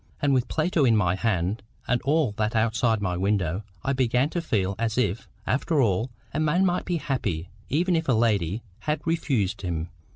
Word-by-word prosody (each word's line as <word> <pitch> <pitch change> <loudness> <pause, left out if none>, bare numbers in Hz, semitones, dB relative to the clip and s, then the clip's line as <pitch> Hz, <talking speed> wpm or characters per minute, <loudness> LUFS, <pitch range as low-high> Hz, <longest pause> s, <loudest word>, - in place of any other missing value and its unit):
And 145 -1 +2
with 125 -2 +2
Plato 160 -1 +1
in 115 -4 +5
my 90 -4 +2
hand, 95 0 0 0.3
and 125 0 +1
all 145 -3 +2
that 110 +2 -1
outside 115 0 +2
my 90 -2 0
window, 95 -1 0 0.2
I 140 - +1
began 130 +2 +2
to 175 - -1
feel 100 - 0
as 115 0 -1
if, 115 -3 0 0.2
after 150 +4 +1
all, 110 -1 +2 0.2
a 150 - -1
man 155 +5 +3
might 180 -1 0
be 175 -1 0
happy, 100 - -2 0.2
even 175 +5 +2
if 160 -3 -1
a - - +5
lady 110 -3 +1 0.2
had 150 -1 -2
refused 135 - 0
him. 85 -2 -3
115 Hz, 190 wpm, -26 LUFS, 100-145 Hz, 0.3 s, in